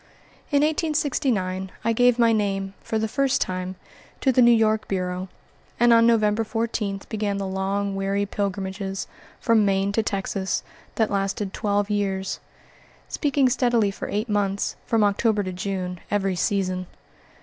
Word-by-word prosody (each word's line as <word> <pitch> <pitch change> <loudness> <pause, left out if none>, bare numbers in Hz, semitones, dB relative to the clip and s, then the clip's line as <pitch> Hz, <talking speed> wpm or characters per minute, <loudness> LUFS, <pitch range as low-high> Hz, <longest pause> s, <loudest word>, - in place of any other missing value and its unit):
In 285 -1 +3
1869 270 - 0
I 230 - +3
gave 245 +1 +4
my 230 -1 +4
name, 195 -2 -1
for 220 - -2
the 220 0 0
first 270 +4 +1
time, 185 0 -2 0.5
to 265 - +4
the 255 - +4
New 240 - +7
York 220 -2 +3
Bureau, 185 -1 -2 0.5
and 240 0 +6
on 230 0 +6
November 215 -1 +3
14 220 -3 -2
began 205 -2 -2
the 200 - -2
long, 195 +1 -1
weary 195 +1 0
pilgrimages, 195 -1 -3 0.3
from 225 -2 +3
Maine 195 0 +1
to 225 - +1
Texas, 195 -2 -2 0.3
that 220 -2 +1
lasted 195 0 -1
twelve 205 -1 0
years; 195 -2 -1 0.7
speaking 285 -3 +2
steadily 240 -4 +2
for - - -6
eight 210 +3 -1
months 200 -2 0
from 225 -2 +3
October 205 +1 +2
to 185 -1 -4
June 180 -1 -3
every 195 -2 0
season. 185 0 -1
205 Hz, 150 wpm, -24 LUFS, 195-230 Hz, 0.7 s, New